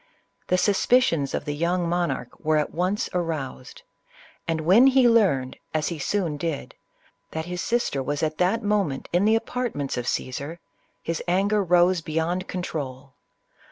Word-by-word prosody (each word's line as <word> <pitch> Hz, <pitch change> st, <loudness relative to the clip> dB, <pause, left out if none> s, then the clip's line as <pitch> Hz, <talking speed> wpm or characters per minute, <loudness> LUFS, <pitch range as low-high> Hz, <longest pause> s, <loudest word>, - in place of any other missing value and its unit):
The 180 Hz, -, +2 dB
suspicions 195 Hz, -, +2 dB
of -, -, -3 dB
the 145 Hz, -, -2 dB
young 170 Hz, +3 st, 0 dB
monarch 170 Hz, -8 st, -1 dB
were 155 Hz, 0 st, +1 dB
at 150 Hz, -, 0 dB
once 185 Hz, +4 st, 0 dB
aroused, 160 Hz, -7 st, -4 dB, 0.6 s
and 165 Hz, -1 st, 0 dB
when 195 Hz, +11 st, +6 dB
he 260 Hz, -2 st, +5 dB
learned, 185 Hz, -, +3 dB, 0.2 s
as 155 Hz, 0 st, +1 dB
he 170 Hz, -3 st, -5 dB
soon 170 Hz, -1 st, -1 dB
did, 155 Hz, -1 st, -4 dB, 0.6 s
that 160 Hz, 0 st, -4 dB
his 180 Hz, 0 st, -4 dB
sister 235 Hz, -, 0 dB
was 145 Hz, +3 st, -2 dB
at 155 Hz, 0 st, -1 dB
that 190 Hz, +6 st, +2 dB
mo 210 Hz, 0 st, +2 dB
ment 135 Hz, -6 st, -5 dB
in 180 Hz, +3 st, +3 dB
the 220 Hz, +1 st, +5 dB
apartments 225 Hz, -, -2 dB
of 120 Hz, 0 st, -3 dB
Caesar, 140 Hz, +8 st, -3 dB, 0.4 s
his 165 Hz, -1 st, -2 dB
anger 200 Hz, +3 st, +2 dB
rose 175 Hz, 0 st, +3 dB
be 155 Hz, -, -7 dB
yond 175 Hz, +3 st, -1 dB
control. 140 Hz, -7 st, -5 dB
170 Hz, 160 wpm, -25 LUFS, 150-195 Hz, 0.6 s, when